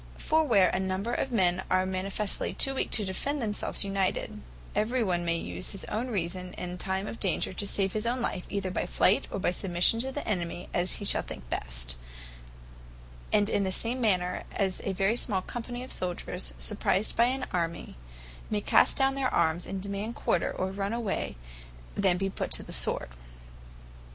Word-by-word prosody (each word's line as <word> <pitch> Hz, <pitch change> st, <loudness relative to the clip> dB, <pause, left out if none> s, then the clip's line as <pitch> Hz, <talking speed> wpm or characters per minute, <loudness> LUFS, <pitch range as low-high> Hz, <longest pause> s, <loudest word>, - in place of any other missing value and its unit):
For 315 Hz, +1 st, +2 dB
where 205 Hz, -, +4 dB
a -, -, 0 dB
number 190 Hz, +5 st, -1 dB
of 270 Hz, -, -1 dB
men 185 Hz, -5 st, +3 dB
are 185 Hz, 0 st, +3 dB
manifestly 190 Hz, +2 st, -1 dB
too 270 Hz, -, +4 dB
weak 270 Hz, -, -1 dB
to 210 Hz, -, +5 dB
defend 280 Hz, +10 st, -2 dB
themselves 210 Hz, -4 st, +1 dB
united, 195 Hz, +2 st, -1 dB, 0.3 s
every 230 Hz, +4 st, +1 dB
one 175 Hz, -4 st, 0 dB
may 170 Hz, 0 st, +1 dB
use 90 Hz, -, -4 dB
his 195 Hz, -, -6 dB
own 225 Hz, +4 st, -2 dB
reason 185 Hz, -4 st, -3 dB
in 180 Hz, 0 st, -6 dB
time 190 Hz, +1 st, -2 dB
of 230 Hz, -, -6 dB
danger, 190 Hz, -1 st, 0 dB
to 200 Hz, +2 st, -1 dB
save 195 Hz, -1 st, +1 dB
his 215 Hz, +1 st, +1 dB
own 245 Hz, +2 st, 0 dB
life, 185 Hz, -6 st, -2 dB
either 195 Hz, -2 st, -2 dB
by 180 Hz, -, -2 dB
flight, 195 Hz, -, +3 dB
or -, -, -3 dB
by 185 Hz, -, +1 dB
submission 180 Hz, +4 st, +3 dB
to 265 Hz, +3 st, -1 dB
the 290 Hz, -, -5 dB
enemy, 175 Hz, -4 st, -2 dB
as 175 Hz, +1 st, +2 dB
hee 205 Hz, -, -4 dB
shall -, -, +6 dB
think 65 Hz, -2 st, -9 dB
best; -, -, -3 dB, 1.3 s
in 210 Hz, -1 st, +4 dB, 0.2 s
the 190 Hz, -, 0 dB
same 235 Hz, +6 st, 0 dB
manner 180 Hz, -5 st, +1 dB
as 190 Hz, -2 st, -1 dB
a 195 Hz, -, 0 dB
very 195 Hz, +4 st, +1 dB
small 195 Hz, -5 st, 0 dB
company 245 Hz, +2 st, -5 dB
of 260 Hz, -, -9 dB
souldiers, 175 Hz, -, -2 dB
surprised 65 Hz, -, +2 dB
by 235 Hz, -, +5 dB
an 255 Hz, +1 st, -1 dB
army, 170 Hz, -, -2 dB, 0.5 s
may 210 Hz, -, +1 dB
cast -, -, +4 dB
down 270 Hz, 0 st, +3 dB
their 270 Hz, -1 st, 0 dB
armes, 165 Hz, 0 st, +1 dB
and 190 Hz, -1 st, -4 dB
demand 200 Hz, +3 st, -4 dB
quarter, 170 Hz, -, +1 dB
or 185 Hz, +1 st, -2 dB
run 200 Hz, +2 st, -2 dB
away, 230 Hz, -, -2 dB, 0.6 s
rather -, -, -3 dB
than 185 Hz, -3 st, +3 dB
be 195 Hz, +1 st, 0 dB
put 195 Hz, -, -3 dB
to -, -, +3 dB
the -, -, -7 dB
sword. -, -, +1 dB
195 Hz, 190 wpm, -29 LUFS, 180-225 Hz, 1.3 s, shall